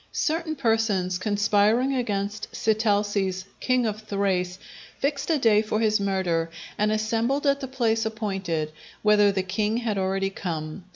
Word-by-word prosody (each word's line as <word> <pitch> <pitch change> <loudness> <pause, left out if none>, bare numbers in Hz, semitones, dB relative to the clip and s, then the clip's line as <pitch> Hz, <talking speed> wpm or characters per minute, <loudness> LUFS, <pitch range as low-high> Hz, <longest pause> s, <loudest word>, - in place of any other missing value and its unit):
Certain 320 0 -1
persons 220 -8 +1
conspiring 210 +5 +2
against 210 -4 -2
Sitalces, 205 -3 +1
king 255 -1 +1
of 215 -1 -2
Thrace, 190 -4 -1 0.4
fixed 280 +1 -1
a 320 - +3
day 225 -5 +4
for 215 0 -1
his 215 -1 +2
murder, 185 -4 0 0.3
and 210 +1 +1
assembled 225 +6 0
at 280 0 +3
the 270 - -5
place 230 -4 +1
appointed, 195 -8 -2 0.3
whither 210 -1 +5
the 190 -1 -1
king 210 +4 0
had 225 -4 -1
already 195 +1 0
come. 165 -1 -5
210 Hz, 140 wpm, -25 LUFS, 195-225 Hz, 0.4 s, whither